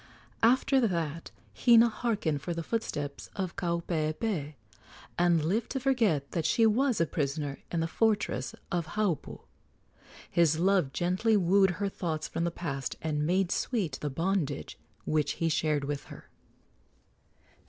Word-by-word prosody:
After 260 +3 +4
that 165 -3 -3 0.2
Hina 235 -1 +6
harkened 210 - -1
for 170 +2 -3
the 165 - -3
footsteps 145 -9 -4
of 190 -3 -3
Kaupeepee, 170 -2 -2 0.6
and 170 -3 +3
lived 215 +8 0
to 270 - -1
forget 225 - +1
that 165 - -1
she 225 - +3
was 240 +2 +2
a 165 - +3
prisoner 145 -2 -3
in 170 - 0
the 165 - 0
fortress 215 +4 0 0.2
of 170 -3 -1
Haupu. 200 -8 -1 0.9
His 165 -3 +3
love 180 -5 +2
gently 185 +8 +1
wooed 190 0 +4
her 200 - -1
thoughts 165 -5 -3
from 170 - -2
the - - +1
past 140 -6 -4
and 150 -1 -1
made 185 +1 +1
sweet 210 - -1
the 150 - -2
bondage 165 -1 -2 0.3
which 155 -1 +1
he 165 - -1
shared 150 -2 +1
with 140 0 -4
her. - - -13
170 Hz, 145 wpm, -29 LUFS, 155-205 Hz, 0.9 s, Hina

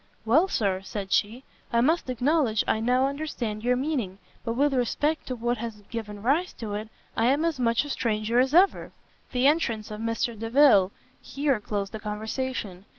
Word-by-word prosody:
"Well, 300 +12 +4
Sir," 195 - 0
said 195 0 -6
she, 230 +6 +1 0.3
"I 235 - +2
must 310 +4 +2
acknowledge 255 -3 +1
I - - +2
now 250 +3 +2
understand 270 -7 -3
your 250 +1 +2
meaning; 250 -9 -2 0.3
but 230 - -2
with 280 +3 +2
respect 290 +5 0
to 255 - -3
what 240 0 -1
has 220 -2 -6
given 210 -3 -6
rise 305 +9 +1
to 215 -3 -6
it, 215 +1 -4 0.3
I 225 - +2
am 285 +5 +2
as 325 -5 -1
much 230 +2 +2
a - - -7
stranger 225 0 0
as 265 +4 +2
ever." 380 +3 +3 0.4
The 250 +1 +1
entrance 235 -8 +1
of 210 - -6
Mr 230 +1 -1
Delvile 225 -3 +4 0.3
here 280 -4 -1
closed 205 -1 -3
the 220 - -6
conversation. 210 -2 -4
235 Hz, 180 wpm, -26 LUFS, 215-275 Hz, 0.4 s, Well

